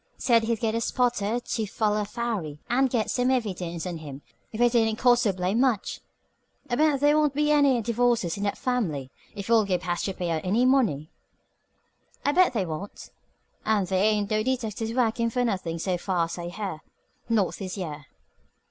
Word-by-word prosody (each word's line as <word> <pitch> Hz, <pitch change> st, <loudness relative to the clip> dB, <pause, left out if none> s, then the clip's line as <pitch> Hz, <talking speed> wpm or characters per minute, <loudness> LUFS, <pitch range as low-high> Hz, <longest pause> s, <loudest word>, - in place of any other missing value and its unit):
Said 230 Hz, -3 st, +3 dB
he'd 230 Hz, -1 st, 0 dB
get 225 Hz, -1 st, 0 dB
a 230 Hz, -, -1 dB
spotter 240 Hz, -2 st, 0 dB
to 225 Hz, -2 st, -3 dB
foller 210 Hz, +1 st, 0 dB
Farry 210 Hz, -10 st, -4 dB
and 265 Hz, +2 st, +2 dB
get 235 Hz, -3 st, 0 dB
some 250 Hz, 0 st, +1 dB
evidence 185 Hz, -9 st, -2 dB
on 175 Hz, -2 st, -4 dB
him 145 Hz, -3 st, -9 dB, 0.3 s
if 220 Hz, -, -7 dB
it 240 Hz, 0 st, +4 dB
didn't 225 Hz, -2 st, +2 dB
cost 245 Hz, 0 st, +4 dB
so 215 Hz, -, +2 dB
blame 185 Hz, +4 st, -1 dB
much. 250 Hz, -6 st, +1 dB, 0.7 s
I -, -, +2 dB
bet 300 Hz, 0 st, +3 dB
the' 290 Hz, 0 st, +5 dB
won't 300 Hz, -2 st, +2 dB
be 300 Hz, 0 st, +2 dB
any 285 Hz, -4 st, +4 dB
divorces 235 Hz, -5 st, +1 dB
in 200 Hz, -, -6 dB
that 200 Hz, 0 st, -1 dB
family 165 Hz, -, -2 dB, 0.2 s
if 200 Hz, -1 st, -6 dB
old 220 Hz, -3 st, +4 dB
Gabe 180 Hz, -2 st, 0 dB
has 175 Hz, -2 st, -1 dB
to 195 Hz, -, -3 dB
pay 175 Hz, -2 st, -2 dB
out 160 Hz, -1 st, -1 dB
any 215 Hz, +7 st, +2 dB
money." 220 Hz, -, +2 dB, 1.1 s
"I 285 Hz, -, +4 dB
bet 360 Hz, -1 st, +4 dB
they 205 Hz, -6 st, 0 dB
won't. 165 Hz, +5 st, -7 dB, 0.5 s
And 215 Hz, -3 st, +1 dB
the' 190 Hz, -, -6 dB
ain't 205 Hz, +2 st, +2 dB
no 215 Hz, 0 st, +2 dB
detectives 225 Hz, -3 st, -2 dB
workin' 230 Hz, -1 st, +1 dB
for 245 Hz, +1 st, 0 dB
nothin' 185 Hz, -7 st, -2 dB
so 180 Hz, +1 st, -1 dB
far 175 Hz, -2 st, 0 dB
as 170 Hz, -, -7 dB
I 170 Hz, -, -5 dB
hear. 185 Hz, -4 st, -5 dB, 0.5 s
Not 215 Hz, -5 st, +1 dB
this 190 Hz, -1 st, -6 dB
year." 150 Hz, -6 st, -6 dB
215 Hz, 195 wpm, -26 LUFS, 185-245 Hz, 1.1 s, the